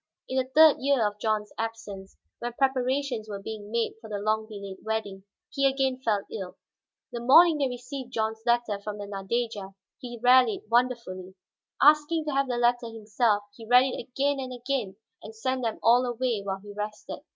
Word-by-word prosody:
In 260 - -3
the 255 0 -2
third 315 -1 +8
year 270 -4 +2
of 205 0 -3
John's 215 -1 -1
absence, 220 -4 -6 0.2
when 240 0 -4
preparations 260 -3 0
were 205 - -4
being 210 0 -7
made 230 0 -1
for 220 - -11
the 210 - -3
long 215 +1 -1
delayed 200 -3 -8
wedding, 205 -3 -4 0.3
he 275 -1 +2
again 265 -1 0
fell 210 -5 0
ill. 190 -4 -6 0.5
The 240 - -4
morning 305 +6 +6
they 275 - +2
received 250 +1 -7
John's 220 -1 -2
letter 235 -4 +1
from 210 0 -5
the 205 - -6
Nadeja, 200 0 -3 0.2
he 240 -1 -8
rallied 250 -4 +5
wonderfully. 230 -7 0 0.5
Asking 300 +2 +4
to 300 - -2
have 275 0 +1
the 245 -1 -2
letter 240 0 +2
himself, 220 -1 0
he 225 -2 -12
read 250 +2 +7
it - - -5
again 280 +2 0
and 260 -1 -5
again, 245 -5 -3 0.3
then 215 - -10
sent 255 +4 -2
them 225 -2 -2
all 240 +2 +5
away 245 -3 -1
while 195 -1 -4
he 205 -1 -10
rested. 210 +4 -6
235 Hz, 185 wpm, -27 LUFS, 210-255 Hz, 0.5 s, third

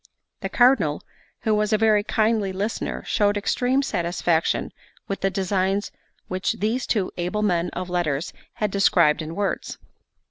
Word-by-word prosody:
The - - -4
Cardinal, 240 - +3 0.4
who 220 - +1
was 210 0 +1
a 215 - +4
very 215 -1 +3
kindly 215 -2 +1
listener, 200 +4 -3
showed 205 -1 +2
extreme 250 +6 +1
satisfaction 170 -6 0 0.3
with 195 - -4
the 195 - +2
designs 195 +1 0 0.4
which 185 +1 -1
these 225 +5 -1
two 200 -5 0
able 180 +5 -1
men 175 -4 +1
of 180 0 -4
letters 170 -5 -1 0.2
had 210 -2 -1
described 170 -6 +3
in 160 +1 -6
words. 200 -1 -2
195 Hz, 145 wpm, -24 LUFS, 175-215 Hz, 0.4 s, a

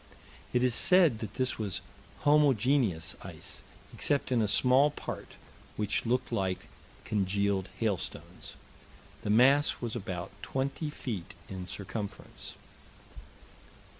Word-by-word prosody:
It 125 0 +2
is 125 -2 +3
said 170 -6 +5
that 110 -2 -6
this 130 -2 -1
was 100 -5 -2 0.4
homogeneous 135 - +3
ice, - - -8 0.3
except 140 -2 0
in 120 -2 +3
a 105 - +2
small 130 +7 +4
part, - - -7 0.4
which 105 +2 -1
looked 125 +2 +1
like 95 -5 -1 0.4
congealed 100 -1 0
hailstones. 105 -6 -3 0.7
The - - -4
mass 135 +7 +5
was 120 -2 -3
about 95 -5 -4
20 140 +3 -2
feet 100 - -5
in 95 -2 -6
circumference. 100 +2 -6
115 Hz, 110 wpm, -31 LUFS, 100-130 Hz, 0.7 s, said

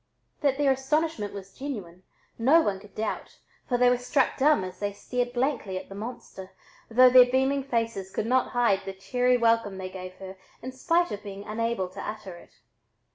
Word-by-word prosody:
That 275 -2 +2
their 285 -2 +3
astonishment 270 -4 -1
was 195 -1 -9
genuine, 200 -11 -7 0.4
no 280 +8 +5
one 195 -9 -1
could 205 0 -17
doubt, 215 0 -4 0.3
for 245 - +2
they 250 0 +4
were 245 0 +3
struck 260 +1 +1
dumb 290 -4 +3
as 185 0 -8
they 205 -1 -2
stared 245 +4 -3
blankly 245 -6 -1
at - - -8
the - - -8
"monster," 200 -3 -8 0.4
though 250 +2 +6
their 250 -1 +8
beaming 265 +1 +1
faces 230 -7 -2
could 200 - -3
not 255 +3 +1
hide 235 -5 +2
the 195 0 -6
cheery 250 +6 +1
welcome 230 -4 +2
they 185 0 -5
gave 185 -1 -8
her 190 0 -10 0.3
in 255 - -5
spite 335 +6 +1
of 205 - -5
being 200 -1 -8
unable 225 -2 -2
to 185 - -8
utter 210 -4 -6
it. 175 - -17
230 Hz, 190 wpm, -27 LUFS, 195-260 Hz, 0.4 s, their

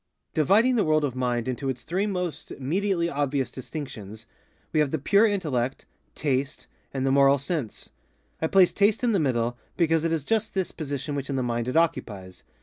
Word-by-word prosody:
Dividing 215 - +4
the 215 - +3
world 155 -1 +2
of 130 -3 -3
mind 125 -2 -1
into 130 +2 -2
its 125 -2 -4
three 190 +5 -1
most 180 -5 -3
immediately 170 +5 0
obvious 140 -3 -1
distinctions, 115 -6 -7 0.5
we 155 - +3
have 150 -2 +3
the 160 - -1
Pure 200 +10 +4
Intellect, 140 - -1 0.3
Taste, 140 0 -1 0.3
and 135 -1 -2
the 135 - +2
Moral 140 0 +5
Sense. 140 - -4 0.5
I 160 - +2
place 185 +1 +5
Taste 205 +3 +2
in 240 - +3
the 200 - +2
middle, 120 -4 0 0.2
because 165 -2 +2
it 165 - 0
is 160 -3 0
just 220 +4 -1
this 190 -2 -1
position 145 -2 -4
which 140 -1 -4
in 140 - -1
the 130 - 0
mind 120 -1 -1
it 125 - 0
occupies. 100 - -1
145 Hz, 190 wpm, -26 LUFS, 130-175 Hz, 0.5 s, Moral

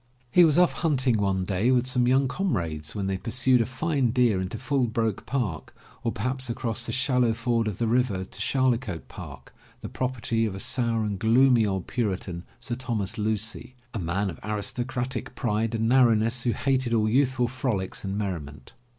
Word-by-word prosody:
He 180 - +7
was 155 -2 +4
off 180 0 +5
hunting 130 -8 +1
one 95 -2 0
day 95 +6 +1
with 125 -1 +3
some 125 -1 +2
young 135 +2 +3
comrades 85 - -2
when 100 -2 -2
they 95 -1 -2
pursued 125 +2 +2
a 115 - -1
fine 135 0 0
deer 115 -5 +2
into 95 +4 -4
Fullbroke 115 -5 -1
Park, 110 - -3 0.3
or 115 - 0
perhaps 130 +4 -2
across 115 -2 -2
the - - -2
shallow 125 -3 +2
ford 115 -1 0
of 105 - -3
the 120 - 0
river 115 -5 +1
to 105 - -7
Charlecote 120 -7 0
Park, - - -10 0.3
the - - -6
property 120 -3 -1
of 100 - -5
a - - -4
sour 115 -1 +1
and 100 -2 -3
gloomy 120 0 +4
old 95 -2 -2
Puritan, 95 -7 -3
Sir 120 - -5
Thomas 115 -4 -3
Lucy, 110 +4 -2 0.2
a 115 - -3
man 95 +3 -1
of 80 - -11
aristo 105 +3 -2
cratic 125 -1 -4
pride 115 0 -1
and 115 0 0
narrowness 120 -1 +4
who 120 - +3
hated 130 -3 0
all 110 -1 +2
youthful 130 +1 +2
frolics 120 -7 -3
and 100 0 -3
merriment. 75 -10 -5
115 Hz, 185 wpm, -26 LUFS, 105-130 Hz, 0.3 s, He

